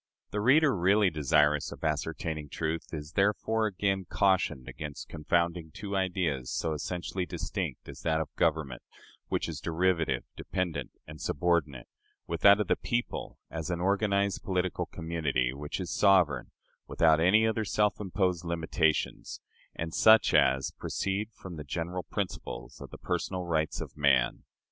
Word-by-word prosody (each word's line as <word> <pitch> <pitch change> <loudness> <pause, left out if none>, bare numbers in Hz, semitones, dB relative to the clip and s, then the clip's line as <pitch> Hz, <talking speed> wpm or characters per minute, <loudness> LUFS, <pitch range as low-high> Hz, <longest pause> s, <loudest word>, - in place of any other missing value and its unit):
The 105 - -1
reader 140 +5 +5
really 95 +2 +3
desirous 75 0 +2
of - - -10
ascertaining 80 0 -2
truth 80 +3 -3
is, 75 -2 -6
therefore, 105 +3 +1
again 95 -1 -1
cautioned 95 -9 +1
against 75 -2 -7
confounding 85 +1 0
two 100 -1 -5
ideas 90 -9 -1
so 80 - -1
essentially 90 +3 -3
distinct - - -4
as - - -9
that 80 -1 +1
of 80 - -5
government, 70 -6 0 0.5
which - - -1
is - - -5
derivative, 80 -6 +1
dependent, 80 -7 -3 0.2
and 75 0 -11
subordinate, 75 -5 0 0.4
with 85 -1 -4
that 100 +1 +8
of 105 - +1
the - - +2
people, 120 0 -3
as 80 +1 -4
an 90 -1 -1
organized 100 +1 +1
political 90 -1 -1
community, 75 -7 -1
which 75 +5 -5
is 90 - -4
sovereign, 90 -10 +3 0.4
without 80 -1 +4
any 100 +7 +5
other 110 0 0
than - - -2
self 105 0 +1
imposed 90 -3 0
limitations, 80 -1 -1 0.4
and 80 0 -4
such 110 0 +6
as 65 +1 +3
proceed 100 +2 -2
from 95 -5 -10
the 75 - -6
general 85 +5 -3
principles 100 +1 -5
of - - -8
the - - -10
personal 95 -1 -2
rights 80 -3 -1
of - - -7
man. 70 -4 +2
85 Hz, 150 wpm, -29 LUFS, 75-95 Hz, 0.5 s, that